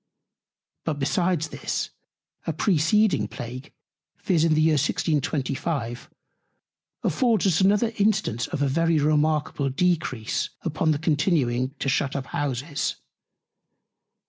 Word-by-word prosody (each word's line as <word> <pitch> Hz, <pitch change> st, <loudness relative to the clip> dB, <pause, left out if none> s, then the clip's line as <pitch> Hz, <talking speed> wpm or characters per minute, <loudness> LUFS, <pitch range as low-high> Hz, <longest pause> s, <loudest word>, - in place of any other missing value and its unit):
But 155 Hz, -3 st, -2 dB
besides 160 Hz, +3 st, 0 dB
this, -, -, -3 dB, 0.6 s
a 165 Hz, -, 0 dB
preceding 185 Hz, +5 st, +2 dB
Plague, 125 Hz, +3 st, -8 dB, 0.5 s
viz. 170 Hz, -5 st, +1 dB
in 160 Hz, -1 st, +3 dB
the 155 Hz, -, +3 dB
Year 160 Hz, +1 st, +4 dB
1625, 145 Hz, -3 st, -1 dB, 0.9 s
affords 235 Hz, -6 st, +2 dB
us 185 Hz, -2 st, +3 dB
another 210 Hz, +4 st, +3 dB
Instance 195 Hz, -, +1 dB
of 145 Hz, -, -2 dB
a -, -, +2 dB
very 165 Hz, +4 st, +2 dB
remarkable 150 Hz, -1 st, +1 dB
Decrease 145 Hz, -6 st, 0 dB
upon 160 Hz, 0 st, 0 dB
the 155 Hz, -, +3 dB
discontinuing 145 Hz, -5 st, +1 dB
to -, -, -3 dB
shut 140 Hz, 0 st, 0 dB
up 135 Hz, -1 st, -2 dB
Houses. 145 Hz, +1 st, -2 dB
155 Hz, 115 wpm, -25 LUFS, 140-170 Hz, 0.9 s, Year